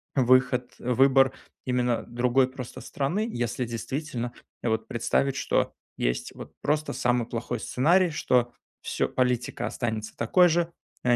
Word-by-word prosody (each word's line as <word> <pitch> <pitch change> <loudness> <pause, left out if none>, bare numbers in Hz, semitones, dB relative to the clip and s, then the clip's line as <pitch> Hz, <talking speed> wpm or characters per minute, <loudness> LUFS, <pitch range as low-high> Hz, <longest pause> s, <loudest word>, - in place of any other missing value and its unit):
выход 130 -1 +3
выбор 135 +2 +4 0.3
именно 125 -2 +1
другой 125 +2 +2
просто 130 -2 -8
страны. 175 +11 -1
Если 120 - -2
действительно 120 +1 -4 0.3
вот 110 -1 0
представить, 135 +3 0
что - - 0 0.2
есть - - -1
вот - - -10
просто 150 +1 0
самый 120 -1 +1
плохой 120 0 -3
сценарий, 175 +11 +3
что 125 -5 +1 0.3
всё, - - -1
политика 125 -1 0
останется 110 -3 -3
такой 175 +10 +4
же, 170 +1 +1 0.3
а, 125 -1 +4
125 Hz, 130 wpm, -27 LUFS, 120-135 Hz, 0.3 s, выбор